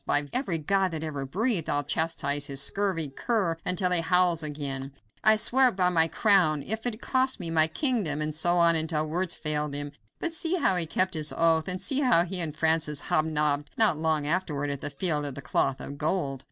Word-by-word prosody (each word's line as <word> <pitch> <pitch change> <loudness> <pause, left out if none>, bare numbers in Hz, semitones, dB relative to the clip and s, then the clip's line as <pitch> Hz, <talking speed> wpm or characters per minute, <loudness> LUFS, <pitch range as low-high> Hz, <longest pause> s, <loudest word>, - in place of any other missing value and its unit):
By 145 0 0
every 225 -11 -1
god 190 +5 0
that 160 0 -4
ever 145 -4 -5
breathed, 200 - -1
I'll 145 0 +1
chastise 145 -1 -1
this 135 -1 -3
scurvy 190 -6 0
cur 185 - -1
until 180 0 0
he 175 -2 +4
howls 175 0 +3
again. 140 -3 -5 0.3
I 215 - +5
swear 260 +4 +3
it 245 - -1
by 180 -2 +2
my 165 -2 +3
crown, 165 -7 +2
if 220 +3 -2
it 225 -2 -4
cost 260 -1 0
me 170 -3 -4
my 160 -1 +5
kingdom," 195 - -1
and 155 0 -2
so 175 +3 +2
on 170 -1 +5
until 155 -1 -1
words 175 +2 -1
failed 150 -2 -2
him. 145 0 -4 0.3
But 335 - -3
see 330 +2 -1
how 285 - +2
he 170 -2 -2
kept 185 +3 0
his 155 -2 -1
oath, 165 -1 +2
and 185 0 -3
see 265 +9 -1
how 245 -12 +4
he 180 +1 -5
and 155 -3 -4
Francis 160 -2 +1
hobnobbed 150 -2 0
not 220 -7 +4
long 155 -1 -1
afterward 150 -3 -1
at 140 - -5
the - - -2
Field 150 +1 -1
of 140 -3 -4
the - - -7
Cloth 130 +2 0
of 140 0 -8
Gold. 150 -4 -1
165 Hz, 215 wpm, -26 LUFS, 150-185 Hz, 0.3 s, I